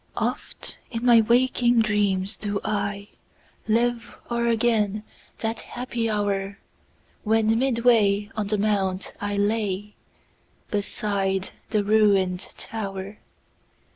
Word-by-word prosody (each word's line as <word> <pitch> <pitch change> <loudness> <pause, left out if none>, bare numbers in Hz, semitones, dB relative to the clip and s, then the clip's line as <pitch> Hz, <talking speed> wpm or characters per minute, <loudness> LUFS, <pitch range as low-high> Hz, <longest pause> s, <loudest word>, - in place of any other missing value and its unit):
Oft - - -3
in 235 0 -4
my 235 -2 +7
waking 240 +1 +3
dreams 200 -2 +1
do 205 -1 -3
ILive 215 +3 -3 0.2
o'er 235 0 +1
again 220 -3 +1 0.3
that 225 0 -2
happy 240 -2 -3
hour, 200 -2 -1 0.7
When 220 +1 +2
midway 230 -5 +3
on 210 -2 -2
the 210 +1 0
mount 195 -2 0
I 205 0 -2
lay, 205 -1 -1 0.8
Beside 200 -2 -1 0.2
the 210 -2 +1
ruin'd 200 -3 +3 0.2
tower. 200 -2 -5
210 Hz, 100 wpm, -25 LUFS, 200-230 Hz, 0.8 s, my